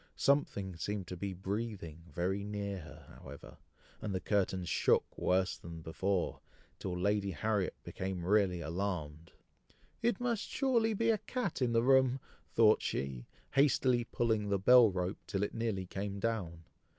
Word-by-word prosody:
Something 100 -10 +1
seemed 100 +2 -3
to 90 - -4
be 95 +1 -4
breathing 95 -4 -4
very 95 +3 -1
near 100 -1 -3
her, 80 - -13
however, - - -11 0.4
and 105 -3 -3
the - - 0
curtains 95 -3 0
shook - - +2
worse 95 +1 +1
than 85 -1 -9
before, 95 +3 -1 0.4
till 90 -2 -3
Lady 100 +1 +1
Harriet 105 0 -1
became 95 -2 -4
really 95 -3 +3
alarmed. 85 -2 -4 0.7
"It 235 +2 +1
must 240 -3 -1
surely 235 -5 +2
be 230 +2 +3
a 215 - +1
cat 240 - -3
in 120 -2 +2
the 115 0 +3
room!" 130 0 +4 0.3
thought 110 -2 +5
she, 65 -3 -3 0.2
hastily 130 -3 +3
pulling 110 -4 0
the 100 - +2
bell 120 +4 +7
rope, 90 0 -2
till 100 0 -1
it 105 - -2
nearly 110 -5 -2
came 100 +2 -4
down. 95 -7 -2
100 Hz, 150 wpm, -33 LUFS, 90-115 Hz, 0.7 s, bell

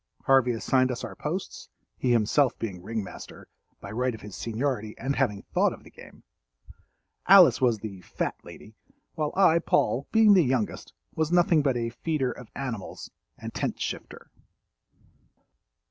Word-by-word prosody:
Harvey 135 -2 +4
assigned 130 +3 +1
us 125 -2 -4
our - - -7
posts—he 125 - -5
himself 120 +3 +2
being 95 -6 -5
ring 110 +3 -4
master, - - -11 0.3
by 100 - -9
right 125 +2 -1
of 110 - -13
his 105 -2 -9
seniority 115 -2 -3
and 140 +1 -2
having 105 -7 0
thought - - +1
of - - -13
the - - -16
game. - - -15 1.0
Alice 175 -12 +7
was 120 -3 +3
the 100 -3 -8
"fat - - -3
lady," 110 - -13 0.4
while 155 -2 -2
I, 180 -4 +5
Paul, 135 -4 0
being 220 -2 +6
the 185 -3 +5
youngest, 125 -5 -2 0.2
was 160 0 -1
nothing 175 -3 +4
but 135 -4 +1
a 115 -1 -2
"feeder 140 -1 -2
of 125 - -11
animals" 115 -8 -6 0.3
and - - -8
tent - - -3
shifter. - - -6
125 Hz, 155 wpm, -26 LUFS, 110-145 Hz, 1.0 s, Alice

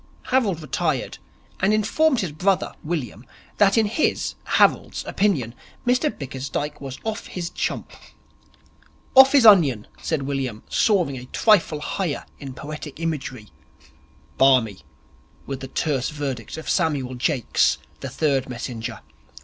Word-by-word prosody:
Harold 205 -11 +1
retired 150 - -2 0.4
and 200 +3 +3
informed 260 +6 +2
his 180 -5 -3
brother, 185 +5 0
William, 150 -8 -4 0.3
that 205 +2 +4
in 225 - +4
his, 225 +9 0
Harold's, - - +2
opinion, 150 - 0 0.3
Mr 250 +5 +2
Bickersdyke 140 - -5
was 135 -2 -6
off 220 -1 -4
his 175 -1 -5
chump. - - -3 1.2
'Off 265 +1 +8
his 275 -5 +6
onion,' 150 - +6 0.2
said 155 -4 -1
William, 135 -5 -3
soaring 190 - +2
a 125 - -10
trifle 170 - +2
higher 175 -1 -3
in 135 -2 -8
poetic 150 0 -8
imagery. 135 -9 -4 0.9
'Barmy,' 125 -7 +4 0.6
was 135 -2 -5
the 135 - -7
terse 135 -2 -1
verdict 140 -5 -5
of 160 - -8
Samuel 145 -8 0
Jakes, 125 0 +1 0.2
the - - -5
third 140 -4 0
messenger. 120 -2 -5
150 Hz, 125 wpm, -23 LUFS, 130-195 Hz, 1.2 s, Off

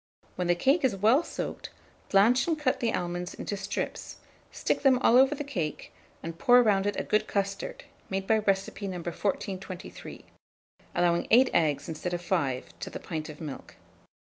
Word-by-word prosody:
When 180 -1 -2
the 175 - +3
cake 275 - +2
is 250 -7 +2
well 220 - +4
soaked, - - -5 0.4
blanch 230 +7 +4
and 325 -2 +1
cut 290 -4 0
the 230 -2 +1
almonds 175 -1 -3
into 205 - -4
strips, 195 - -4 0.4
stick - - -1
them 270 -2 +5
all 245 - +4
over 265 +3 +6
the 295 - -4
cake, 175 - -4 0.3
and 165 +1 -6
pour 245 0 +6
round 200 -3 +2
it 205 - -1
a - - -1
good 215 0 +1
custard, 200 0 -3 0.3
made 195 0 -2
by 220 +2 +3
recipe 200 0 -1
No. 185 -2 -4
1423, 185 +1 -5 0.7
allowing 170 -1 +2
8 250 +3 +6
eggs 150 -4 +1
instead 170 +2 -3
of 175 - -5
5 130 - -2
to 90 - -5
the - - -7
pint 155 -3 -5
of 150 - -10
milk. 150 -4 -8
195 Hz, 175 wpm, -28 LUFS, 175-235 Hz, 0.7 s, over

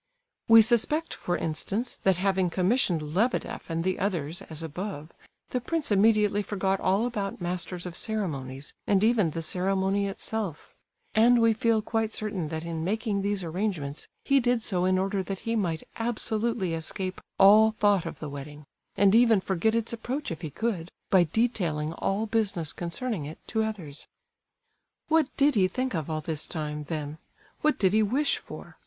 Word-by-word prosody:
We 225 0 +9
suspect, 245 +8 +1
for 175 - -2
instance, 195 +9 -2
that 190 -2 +2
having 190 -1 +1
commissioned 180 - +1
Lebedeff 225 +1 -1
and 165 0 -1
the 185 +1 -1
others, 175 -5 -2
as 160 0 -6
above, 160 -1 -6 0.4
the 250 - -1
prince 315 0 -1
immediately 210 0 +4
forgot 195 -2 -1
all 195 +5 +2
about 205 -5 -3
masters 180 0 -3
of 175 -1 -6
ceremonies 145 - -4
and 200 0 +3
even 220 -6 +3
the 165 +1 -4
ceremony 195 +3 0
itself; 195 -4 -5 0.4
and 235 +2 +5
we 230 -1 +4
feel 220 0 +1
quite 225 -1 -1
certain 200 -6 -3
that 160 +1 -5
in 165 -1 -3
making 210 +2 -1
these 200 -1 -1
arrangements 165 -5 -3 0.2
he 275 0 +4
did 245 -2 +1
so 180 -4 0
in 185 0 +3
order 195 +1 0
that 190 0 -5
he 230 0 -1
might 170 -7 -1
absolutely 225 -4 -1
escape 185 +3 -4 0.2
all 210 +3 +7
thought 205 -4 +2
of - - -6
the 155 - -6
wedding, 145 +1 -8 0.3
and 200 0 +5
even 230 -2 +6
forget 190 +4 0
its 230 0 -1
approach 250 +4 -4
if 165 - -5
he 160 - -4
could, 180 -1 -2 0.2
by 185 -3 +6
detailing 170 -10 0
all 195 +5 -1
business 205 -8 0
concerning 175 - -3
it 155 +2 -8
to 220 - -1
others. 185 -10 -4 1.0
What 320 -3 +4
did 285 +1 +4
he 195 -5 +4
think 255 +6 -2
of 160 -3 -3
all 155 -1 -2
this 155 -1 -3
time, 150 -2 -4
then? 150 0 -5 0.4
What 305 0 +2
did 190 -1 +2
he 220 - +4
wish 265 +8 +1
for? - - -11
195 Hz, 170 wpm, -27 LUFS, 165-220 Hz, 1.0 s, We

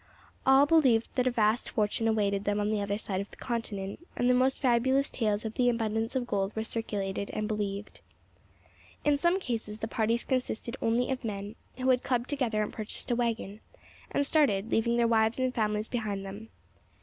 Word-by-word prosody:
All 270 +1 +7
believed 270 -8 +4
that 255 -1 +1
a - - +5
vast 225 0 +1
fortune 215 0 0
awaited 200 -3 +1
them 205 0 0
on 210 +1 0
the 210 -1 0
other 200 0 -1
side 195 -3 -2
of 200 - -7
the - - -15
continent, 205 -5 -4 0.2
and 245 - +2
the 250 - +5
most 260 +1 +2
fabulous 260 +2 +2
tales 215 -2 0
of 220 - -3
the 245 +1 +3
abundance 225 0 -1
of 255 -2 0
gold 200 -3 -1
were 220 - -1
circulated 200 -3 -3
and 215 0 -1
believed. 205 -1 -4 1.0
In 295 -1 +4
some 345 +6 +2
cases 225 - -4
the 220 - -3
parties 230 +1 0
consisted 250 -2 -2
only 235 +3 +1
of 260 -1 -3
men 205 -1 -4 0.2
who 260 0 +2
had 250 -1 +3
clubbed 250 0 -1
together 235 -7 0
and - - -5
purchased 215 +3 -4
a - - +3
waggon, 225 -4 -2 0.5
and 285 - +1
started, 230 -9 +2
leaving 235 +1 +2
their 235 - +3
wives 225 0 +3
and 255 -1 0
families 215 -1 0
behind 210 -5 -3
them. 205 +3 -8
225 Hz, 195 wpm, -29 LUFS, 210-250 Hz, 1.0 s, All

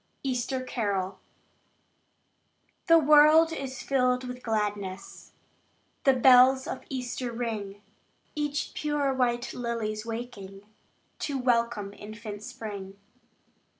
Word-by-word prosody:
Easter 255 0 -2
Carol 200 -6 -2 1.7
The 330 -1 +7
world 305 +2 +6
is 270 -3 -6
filled 250 -2 +1
with 250 0 -7
gladness; 205 -4 -4 0.7
The 270 - +6
bells 260 +1 +6
of - - -5
Easter 250 -1 -4
ring; 215 -4 -5 0.5
Each 295 -1 -2
pure 295 -2 0
white 240 -1 0
lily's 230 -3 -3
waking, 225 -4 -7 0.6
To 285 -2 -2
welcome 235 -5 0
infant 210 0 -8
spring. 200 -3 -8
240 Hz, 95 wpm, -28 LUFS, 210-265 Hz, 1.7 s, The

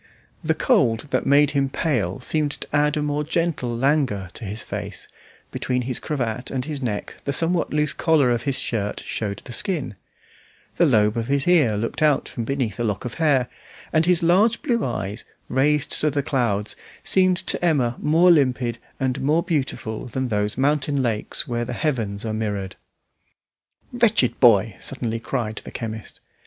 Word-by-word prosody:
The - - +1
cold 115 -1 +2
that - - 0
made 145 +1 +5
him 140 -2 +1
pale 120 - -1
seemed 150 +2 -1
to - - -6
add 150 +1 +2
a 150 - 0
more 150 0 -1
gentle 150 -7 -1
languor 130 - +1
to 115 - -8
his 105 +2 -5
face; - - -6 0.4
between 125 0 -1
his 125 0 -2
cravat 125 -5 -3
and 130 -1 -3
his 150 -2 -5
neck 110 -5 -4
the 140 - 0
somewhat 165 +4 +1
loose 150 -1 +1
collar 150 -7 +3
of 120 - 0
his 135 -2 0
shirt 105 -3 -1
showed 100 -3 -4
the - - -8
skin; 170 - -1 0.8
the - - +5
lobe 105 +1 +3
of 115 0 -2
his 140 +1 0
ear 145 -12 +4
looked 115 +8 -3
out 150 -2 +3
from 115 - -5
beneath 120 -6 -2
a - - 0
lock 105 -2 -2
of 120 - -4
hair, 135 -6 +3 0.5
and 160 +1 +3
his 180 -1 +3
large 205 +9 +3
blue 240 -6 +1
eyes, 105 -3 -3 0.3
raised 145 +3 +1
to 150 - +3
the 140 -1 -1
clouds, 110 -7 0 0.3
seemed 185 -1 +4
to 185 -1 -2
Emma 135 -8 +2
more 165 +4 +4
limpid 125 -6 +2 0.2
and 130 0 -1
more 155 +5 +2
beautiful 135 -10 -2
than 130 +1 -3
those 105 0 -1
mountain 140 0 +1
lakes 115 +5 -1
where 120 -2 -1
the 120 - -4
heavens 115 -9 -2
are 110 - -2
mirrored. 100 -3 -3 1.2
"Wretched 220 - +2
boy!" 110 -4 +5
suddenly 115 -4 -3
cried 115 -3 -3
the - - -9
chemist. 110 -2 -7
130 Hz, 175 wpm, -23 LUFS, 115-150 Hz, 1.2 s, made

